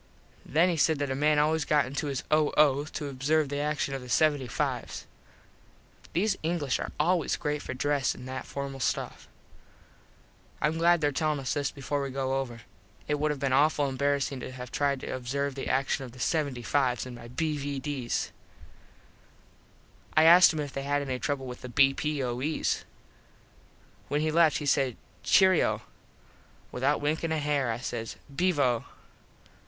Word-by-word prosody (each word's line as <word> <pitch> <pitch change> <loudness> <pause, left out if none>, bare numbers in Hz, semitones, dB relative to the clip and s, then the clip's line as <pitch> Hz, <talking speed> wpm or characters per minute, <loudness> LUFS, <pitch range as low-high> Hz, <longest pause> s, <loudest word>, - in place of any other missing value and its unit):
Then 165 +4 +3
he 170 - 0
said 155 +1 +3
that 145 -1 -2
a - - -1
man 150 +2 +3
always 155 +1 +2
got 150 -3 +2
into 140 +4 -3
his 135 -3 -3
O.O. 150 -2 +3
to 150 -1 -5
observe 140 +2 +1
the 145 0 -2
action 150 -1 -1
of 135 - -4
the 125 - -10
75s. 140 -2 0 1.1
These 195 +4 +1
English 155 -5 -1
are - - -4
always 170 0 +2
great 150 0 -2
for 130 - -6
dress 145 0 0
an 125 - -10
that 130 0 -6
formal 140 -1 -5
stuff. - - -2 1.3
Im 155 +2 0
glad 170 0 +4
there 145 -1 +2
tellin 150 +1 0
us 135 - -2
this 145 -2 -1
before 140 +1 -3
we 140 - -3
go 135 0 -1
over. 120 -4 -6 0.5
It 150 0 0
would 155 +1 +1
have 150 -2 -2
been 135 -1 0
awful 145 +1 +3
embarassing 140 0 0
to 125 - -6
have 125 -1 -8
tried 140 -2 0
to - - -4
observe 140 +3 -2
the 135 - -5
action 135 0 0
of 125 -3 -9
the - - -14
75s 130 -2 0
in 130 - -8
my 120 -1 -10
B.V.Ds. 140 -2 -2 1.9
I 155 - +7
asked 175 +2 +8
him 155 - -4
if 145 -2 -6
they 135 - -3
had 145 +1 0
any 130 -2 -3
trouble 140 -1 -2
with 125 -1 -8
the 125 - -7
B.P.O.Es. 135 +1 +1 1.2
When 145 +1 0
he 155 0 +1
left 165 -1 +4
he 150 - -5
said 135 -3 +1 0.3
"Cheero." 190 -3 +4 0.9
Without 140 +4 0
winkin 160 +2 -1
a 160 - +1
hair 145 -4 0
I 115 - -2
says 120 -2 -5 0.2
"Beevo." 140 -9 +2
140 Hz, 165 wpm, -28 LUFS, 130-150 Hz, 1.9 s, asked